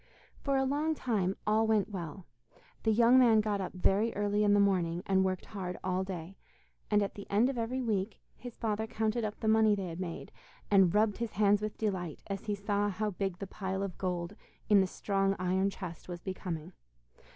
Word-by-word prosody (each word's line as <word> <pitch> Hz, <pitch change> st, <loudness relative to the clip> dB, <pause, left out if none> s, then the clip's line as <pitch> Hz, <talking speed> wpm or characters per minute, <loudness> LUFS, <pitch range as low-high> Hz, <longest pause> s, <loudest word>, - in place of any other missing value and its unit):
For 275 Hz, -1 st, +1 dB
a 265 Hz, -, +2 dB
long 300 Hz, +4 st, 0 dB
time 200 Hz, -9 st, 0 dB
all 220 Hz, +1 st, +3 dB
went 215 Hz, -1 st, +2 dB
well; 180 Hz, -1 st, -6 dB, 0.6 s
the 220 Hz, -, +2 dB
young 235 Hz, +3 st, +6 dB
man 230 Hz, -4 st, +6 dB
got 210 Hz, -2 st, 0 dB
up 185 Hz, -, -4 dB
very 195 Hz, +5 st, +2 dB
early 205 Hz, +1 st, +1 dB
in 205 Hz, -1 st, +4 dB
the -, -, +4 dB
morning, 180 Hz, -4 st, +1 dB
and 190 Hz, -1 st, +3 dB
worked 185 Hz, -1 st, -1 dB
hard 185 Hz, -3 st, -4 dB
all 185 Hz, 0 st, 0 dB
day, 185 Hz, -1 st, -7 dB, 0.5 s
and 210 Hz, -1 st, +3 dB
at 200 Hz, -, -3 dB
the 200 Hz, -, -9 dB
end 220 Hz, +6 st, +3 dB
of 260 Hz, -, -7 dB
every 250 Hz, +3 st, -2 dB
week 210 Hz, -2 st, -1 dB, 0.2 s
his 245 Hz, -2 st, -10 dB
father 220 Hz, 0 st, -1 dB
counted 220 Hz, +1 st, -1 dB
up 210 Hz, -1 st, -4 dB
the 220 Hz, -, -1 dB
money 220 Hz, -1 st, +5 dB
they 195 Hz, -2 st, -4 dB
had 165 Hz, +1 st, -7 dB
made, 175 Hz, -3 st, -5 dB, 0.4 s
and 195 Hz, -2 st, +5 dB
rubbed 210 Hz, -1 st, +3 dB
his 230 Hz, -2 st, -3 dB
hands 205 Hz, +1 st, +3 dB
with 215 Hz, 0 st, -4 dB
delight, 185 Hz, -7 st, -3 dB
as 195 Hz, -1 st, -5 dB
he 210 Hz, -2 st, -1 dB
saw 205 Hz, 0 st, 0 dB
how 210 Hz, +2 st, -2 dB
big 190 Hz, -1 st, -3 dB
the 195 Hz, -, -5 dB
pile 190 Hz, 0 st, -3 dB
of 195 Hz, -3 st, -5 dB
gold 180 Hz, 0 st, -2 dB, 0.3 s
in 205 Hz, -2 st, +7 dB
the 190 Hz, -, +1 dB
strong 195 Hz, +1 st, 0 dB
iron 185 Hz, +2 st, +1 dB
chest 180 Hz, -4 st, -8 dB
was 175 Hz, -1 st, -5 dB
becoming. 180 Hz, -3 st, -5 dB
200 Hz, 205 wpm, -31 LUFS, 185-220 Hz, 0.6 s, in